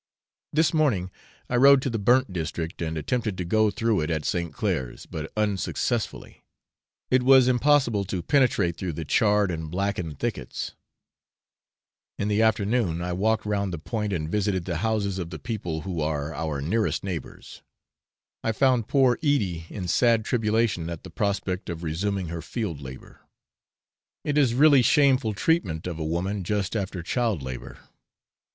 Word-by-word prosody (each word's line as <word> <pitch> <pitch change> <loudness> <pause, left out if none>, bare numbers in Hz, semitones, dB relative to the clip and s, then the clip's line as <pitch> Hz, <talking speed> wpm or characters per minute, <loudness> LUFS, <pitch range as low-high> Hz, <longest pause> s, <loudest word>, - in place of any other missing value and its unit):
This 155 -1 +2
morning 120 - +1 0.4
I 125 - 0
rode 140 +2 +7
to - - 0
the 115 - -2
burnt 120 +1 +3
district, 80 -1 -4
and 80 -1 -2
attempted 110 - -2
to 90 - -3
go 110 +4 +3
through 110 -2 0
it 75 - -2
at 80 -2 -2
St. 85 -2 -1
Clair's, 65 -2 -3
but 80 0 -6
unsuccessfully: 105 -3 -2 0.7
it 130 0 +4
was 130 0 +6
impossible 130 -4 +3
to 90 -2 -3
penetrate 100 - +2
through 90 -2 -3
the 80 +1 -5
charred 105 +2 +3
and 80 -2 -5
blackened 90 -4 -2
thickets. - - -4 1.4
In 105 - -1
the 105 +1 +2
afternoon 105 -5 +1
I 90 0 -2
walked 110 +4 +1
round 100 -2 -1
the 85 - -4
point, 105 +6 -3
and 80 -5 -2
visited 95 -1 -1
the 85 -3 -2
houses 100 -1 -1
of 85 -2 -4
the 85 - -6
people 90 -9 -4
who 85 -1 -4
are 75 0 -2
our 75 -3 -3
nearest 105 +9 0
neighbours. 90 -5 -7 0.8
I 115 - 0
found 125 -2 +2
poor 130 -3 +3
Edie 100 - 0
in 95 -4 -5
sad 115 +5 +3
tribulation 110 -7 0
at 85 -2 -6
the - - -10
prospect 100 -3 -2
of 85 0 -5
resuming 90 +3 -2
her 85 0 -5
field 95 - -4
labour. 65 -1 -11 1.0
It 145 - -1
is 135 -6 +3
really 140 0 +6
shameful 130 -4 +3
treatment 100 - 0
of 85 -3 -4
a - - -2
woman 90 +5 -2
just 100 +2 -1
after 95 -4 -3
child 110 - -1
labour. 65 -1 -7
100 Hz, 160 wpm, -25 LUFS, 85-115 Hz, 1.4 s, rode